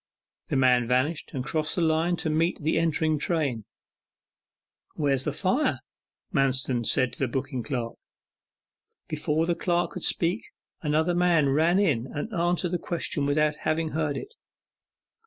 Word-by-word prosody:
The - - -2
man 125 -2 +4
vanished 130 +6 0
and 130 -1 -3
crossed 155 0 -1
the 175 - 0
line 160 +2 +2
to 160 - -2
meet 165 +3 +1
the 160 +2 +1
entering 160 -1 +1
train. 140 - -1 1.3
'Where 145 -3 +1
is 130 -1 -1
that 150 - -1
fire?' 200 - 0 0.5
Manston 130 -4 +1
said 130 -2 +3
to - - -12
the 135 - +1
booking 130 0 -3
clerk. 120 -3 -3 1.1
Before 155 +1 0
the 175 - +1
clerk 175 0 0
could - - -7
speak, 175 +6 +1 0.4
another 160 +3 +1
man 175 -5 +3
ran 160 +6 +3
in 145 - +1
and 145 - -5
answered 175 0 0
the 180 - -1
question 160 -4 -2
without 150 +1 +1
having 155 +1 -1
heard 155 -2 -1
it. 410 - -8
155 Hz, 155 wpm, -26 LUFS, 135-170 Hz, 1.3 s, man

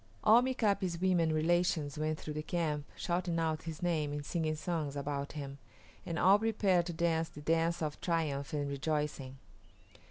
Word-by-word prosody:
All 225 +3 +7
Mika´pi's 205 -9 0
women 175 -3 +2
relations 160 -1 +1
went 155 0 -1
through 150 - -5
the 150 - -3
camp, 155 -3 -1
shouting 175 -1 -1
out 160 -1 0
his 160 0 -6
name 155 -4 0
and 145 0 -4
singing 160 -1 -1
songs 155 -3 -3
about 140 0 -3
him, 140 -2 -6 0.5
and 165 - -2
all 195 +3 +6
prepared 200 -6 +2
to 175 - -3
dance 165 -1 +1
the 150 - -11
dance 165 +2 +1
of 150 -1 -4
triumph 155 -5 -1
and 145 -1 -1
rejoicing. 140 -2 -2
160 Hz, 165 wpm, -33 LUFS, 150-175 Hz, 0.5 s, All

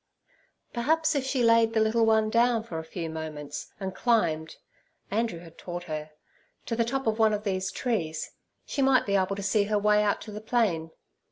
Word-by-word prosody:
Perhaps 315 +7 +2
if 280 -3 0
she 265 -2 +1
laid 230 -1 +5
the 225 - +2
little 220 +1 +3
one 220 -1 +3
down 235 -1 +3
for 170 -8 -5
a - - -6
few 165 +1 -5
moments, 155 -2 -6
and 190 -1 -4
climbed 170 -11 +1 0.6
(Andrew 225 -3 0
had 165 -1 -14
taught 175 0 -6
her) 155 -2 -5 0.6
to 230 - -2
the 230 - +2
top 270 +4 -2
of 220 0 0
one 220 -1 +4
of 210 - -5
these 190 -2 -1
trees, 165 -11 -2 0.3
she 280 - -2
might 265 -1 +4
be 200 - 0
able 195 0 +1
to 200 - -5
see 205 +1 +2
her 210 0 +1
way 210 0 +4
out 205 -1 +1
to 215 - -8
the 210 +1 -7
plain. 215 -9 0
210 Hz, 200 wpm, -27 LUFS, 175-230 Hz, 0.6 s, laid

